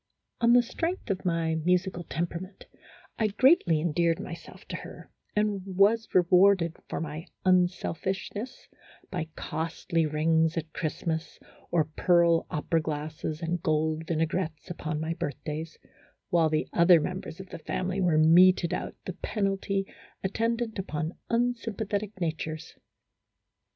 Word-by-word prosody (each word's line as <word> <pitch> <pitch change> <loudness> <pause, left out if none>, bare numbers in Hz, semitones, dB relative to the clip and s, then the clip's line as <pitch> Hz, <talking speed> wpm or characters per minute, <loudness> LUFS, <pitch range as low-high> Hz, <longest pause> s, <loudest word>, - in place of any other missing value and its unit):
On 235 0 +5
the 245 0 +6
strength 330 - -3
of 190 -1 -3
my 165 -2 +1
musical 175 +2 0
temperament, 175 +4 -5 0.5
I 220 - +3
greatly 210 - +4
endeared 165 +1 +1
myself 170 -1 -9
to - - -3
her, - - -11 0.2
and 210 -2 +1
was 200 +4 +3
rewarded 180 -1 +5
for - - -3
my 155 +2 -5 0.2
unselfishness 185 - 0 0.4
by 175 -4 -3
costly 165 0 -1
rings 160 +2 +2
at 160 -1 -4
Christmas, 160 0 -3 0.3
or 170 -2 +3
pearl 170 +1 +3
opera 160 +2 0
glasses 155 +1 -4
and 170 +1 -1
gold 155 0 0
vinaigrettes 165 +1 -2
upon 155 -3 -3
my 160 +1 -2
birthdays, 155 +1 -5 0.5
while 165 -2 +4
the 155 0 0
other 170 0 +6
members 180 +1 -5
of 190 -1 -9
the - - -7
family 185 +4 -2
were 175 -4 +3
meted 170 +2 +6
out - - -4
the 185 - -4
penalty 195 0 -1 0.4
attendant 230 +3 -1
upon 160 -3 -3 0.2
unsym 235 -2 0
pathetic 205 -1 -3
natures. 160 -1 -3
170 Hz, 130 wpm, -28 LUFS, 160-195 Hz, 0.5 s, the